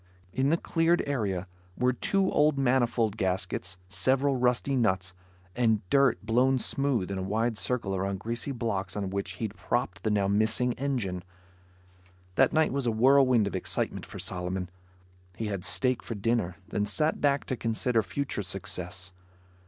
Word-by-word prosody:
In 130 +2 +2
the 165 - +3
cleared 170 0 +2
area, 100 -10 -1 0.3
were 125 0 +2
two 195 +9 +1
old 150 -1 +3
manifold 120 -5 +2
gaskets, 95 -1 -2
several 135 +7 +1
rusty 125 +2 +1
nuts, 95 -6 +1 0.4
and 110 -5 +1
dirt 135 -3 +4
blown 125 +4 +3
smooth 130 -7 0
in 95 - -2
a - - -2
wide 110 +5 0
circle 110 -4 -1
around 95 +1 -1
greasy 115 +5 -4
blocks 100 -7 -2
on 100 -2 -2
which 100 -1 -3
he'd 105 +1 -4
propped 95 -6 -2
the 110 - 0
now 100 -2 +2
missing 110 +4 +2
engine. 120 -10 -2 1.1
That - - +4
night 160 -4 +2
was 135 -3 0
a - - +3
whirlwind 130 0 +5
of 100 - -3
excitement 95 - -2
for 100 +1 -9
Solomon. 90 -1 -3 0.6
He 110 - -4
had 100 -3 -3
steak 125 +5 +1
for 115 - -5
dinner, 105 -4 0
then 105 0 -1
sat 155 +9 0
back 140 -1 +2
to 130 - -2
consider 115 0 0
future 135 0 -3
success. 90 0 -5
115 Hz, 160 wpm, -28 LUFS, 95-130 Hz, 1.1 s, whirlwind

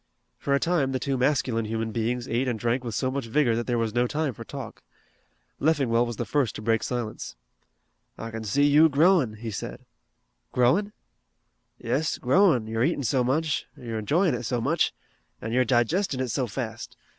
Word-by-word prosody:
For 140 - +1
a - - +2
time 155 -6 +1
the 130 - 0
two 135 +1 -1
masculine 125 -3 +1
human 110 +1 -2
beings 120 +2 -2
ate 125 +3 0
and 120 -3 -1
drank 120 +3 -1
with 115 -4 -4
so 130 +3 0
much 135 -3 -3
vigor 120 -1 +2
that 120 +1 -3
there 120 -1 +1
was 115 -2 -1
no 120 +1 +2
time 150 0 -1
for 115 - -9
talk. 135 0 -8 0.8
Leffingwell 135 -6 +2
was 120 - -4
the 120 - -3
first 130 +2 0
to - - -6
break 115 0 +2
silence. 120 - -4 0.8
"I 115 - -6
kin 110 0 -5
see 110 +7 +1
you 150 +3 +6
growin'," 150 - +3
he 110 +1 -6
said. 100 - -6 0.7
"Growing?" 170 +13 +2 0.9
"Yes, 130 +6 -1
growin', 135 - +3
you're 110 +1 -1
eatin' 145 0 0
so 125 +1 +1
much, 150 +4 0
you're 115 -4 -5
enjoyin' 160 - +2
it 120 - -2
so 120 +1 -1
much, - - +1 0.5
an' 115 - -5
you're 125 +2 +3
digestin' 130 - +1
it 130 -1 -1
so 125 +2 -1
fast. 115 0 -6
125 Hz, 190 wpm, -26 LUFS, 115-140 Hz, 0.9 s, you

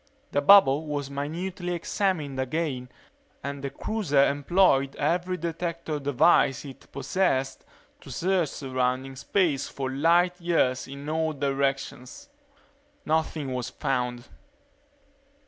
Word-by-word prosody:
The 145 - +1
bubble 155 -3 +6
was 145 -2 -3
minutely 175 +6 -4
examined 170 -6 -1
again 130 -2 -2 0.5
and 140 0 -5
the 140 - -2
cruiser 145 -3 +1
employed 140 -2 +2
every 175 +4 0
detector 170 -2 -3
device 140 0 +3
it 135 -2 -12
possessed 135 -1 -1 0.4
to - - -14
search 180 -3 0
surrounding 130 -1 -2
space 150 0 0
for 135 -1 -4
light 175 +5 +2
years 160 -7 +1
in 140 +1 -8
all 160 0 0
directions. 135 - -2 0.8
Nothing 155 -3 -1
was 125 0 -3
found. 125 -3 -2
145 Hz, 110 wpm, -26 LUFS, 135-170 Hz, 0.8 s, bubble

